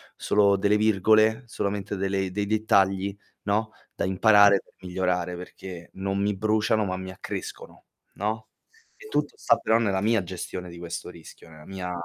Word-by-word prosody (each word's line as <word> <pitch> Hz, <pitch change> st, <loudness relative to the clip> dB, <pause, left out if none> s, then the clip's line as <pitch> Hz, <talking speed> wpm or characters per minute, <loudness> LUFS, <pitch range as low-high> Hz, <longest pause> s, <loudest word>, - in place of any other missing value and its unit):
solo 100 Hz, -1 st, +3 dB
delle 100 Hz, +2 st, +2 dB
virgole, 110 Hz, +2 st, +3 dB
solamente 100 Hz, -2 st, -3 dB
delle 95 Hz, -1 st, -1 dB
dei 100 Hz, +2 st, -1 dB
dettagli, 100 Hz, -2 st, +2 dB, 0.3 s
no, 110 Hz, +2 st, 0 dB, 0.2 s
da -, -, -2 dB
imparare 100 Hz, +1 st, +6 dB
per -, -, -28 dB
migliorare, 90 Hz, -1 st, -1 dB
perché 90 Hz, -1 st, -9 dB
non 95 Hz, +1 st, -2 dB
mi 100 Hz, +1 st, +1 dB
bruciano 110 Hz, +1 st, +1 dB
ma 95 Hz, -1 st, -2 dB
mi 95 Hz, 0 st, -6 dB
accrescono, 95 Hz, -, -7 dB, 0.3 s
no, 110 Hz, +2 st, -3 dB, 0.5 s
e 415 Hz, -, -13 dB
tutto 440 Hz, -, -1 dB
sta -, -, +3 dB
però 110 Hz, -, +2 dB
nella 100 Hz, -5 st, +1 dB
mia 110 Hz, -1 st, +2 dB
gestione 90 Hz, 0 st, -6 dB
di 85 Hz, -, -10 dB
questo 85 Hz, 0 st, -6 dB
rischio, 85 Hz, -1 st, -14 dB
nella 80 Hz, -1 st, -14 dB
mia 95 Hz, -2 st, -5 dB
100 Hz, 160 wpm, -26 LUFS, 95-105 Hz, 0.5 s, imparare